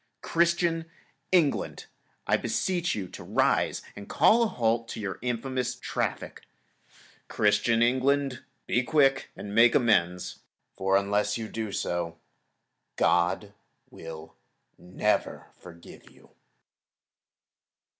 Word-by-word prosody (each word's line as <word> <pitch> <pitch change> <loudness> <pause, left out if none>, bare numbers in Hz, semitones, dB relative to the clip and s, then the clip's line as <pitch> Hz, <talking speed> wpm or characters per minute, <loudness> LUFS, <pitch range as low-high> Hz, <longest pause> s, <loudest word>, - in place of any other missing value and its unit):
Christian 170 -1 +1 0.4
England! 170 -6 +1 0.4
I - - +3
beseech 180 -2 -1
you 95 -3 -4
to - - -10
rise - - +1
and 100 0 -10
call 230 +2 +4
a 230 - +3
halt 115 - -1
in 110 - -6
your 95 -2 -4
infamous 125 +1 -2
traffic. 125 - -4 0.9
Christian 115 +2 +2
England! 130 +1 +1 0.2
Be 120 - +1
quick 135 0 +2
and 100 0 -7
make 115 +2 +5
amends, 90 -8 +1 0.3
for 95 0 +2
unless 105 +2 0
you 110 -1 -5
do 110 -1 -5
so, 85 -3 -3 0.8
God - - +1 0.4
will 80 -1 -10 0.4
never 95 +4 -1
forgive 85 -1 -14
you. - - -22
115 Hz, 105 wpm, -27 LUFS, 100-135 Hz, 0.9 s, make